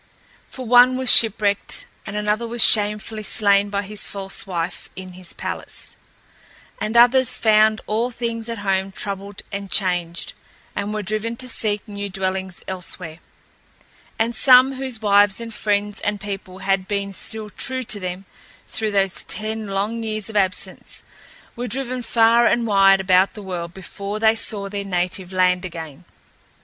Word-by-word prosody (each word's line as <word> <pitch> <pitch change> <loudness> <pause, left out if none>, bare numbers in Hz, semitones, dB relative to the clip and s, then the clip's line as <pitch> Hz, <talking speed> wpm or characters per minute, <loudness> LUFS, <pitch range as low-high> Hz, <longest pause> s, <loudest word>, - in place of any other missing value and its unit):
For 255 - -8
one 250 +2 +6
was 260 -2 +3
shipwrecked 205 -2 +2 0.2
and 205 - -6
another 210 +2 -1
was 235 0 +3
shamefully 210 +1 +2
slain 200 -1 +3
by 200 0 -2
his 205 +1 -5
false 195 0 -4
wife 175 -1 -4
in 185 -1 -9
his 180 0 -7
palace, - - -5 0.8
and 220 +2 -1
others 250 +1 +5
found 215 0 +4
all 225 +3 0
things 230 -1 -3
at 230 - -4
home 190 0 0
troubled 200 +1 -5
and 200 0 -5
changed 175 -4 0 0.4
and 205 - -3
were 215 0 -3
driven 215 +3 -2
to 255 +2 -6
seek 215 -3 -2
new 200 -1 -5
dwellings 190 -1 -3
elsewhere. 180 -3 -5 1.0
And 230 +2 0
some, 255 +2 +6
whose 260 -4 -5
wives 205 0 +4
and 230 -1 -7
friends 205 -1 -1
and 205 0 -2
people 195 -2 -7
had 195 -1 +1
been 200 -1 -2
still 215 +1 -5
true 260 +5 -3
to 215 -3 0
them 185 +1 -5 0.4
through 220 -1 -1
those 195 -2 +1
ten 220 0 -1
long 205 +4 -2
years 215 -2 -2
of - - -14
absence, 190 -2 -2 0.5
were 245 0 -4
driven 255 +1 -3
far 235 0 +4
and 235 -1 +2
wide 195 -2 +5
about 185 0 +3
the 210 - -8
world 175 -3 -5
before 200 +2 -6
they 220 0 +4
saw 205 -3 -2
their 200 0 -4
native 180 -1 -2
land 180 -1 +2
again. 160 -5 -8
205 Hz, 160 wpm, -21 LUFS, 190-225 Hz, 1.0 s, one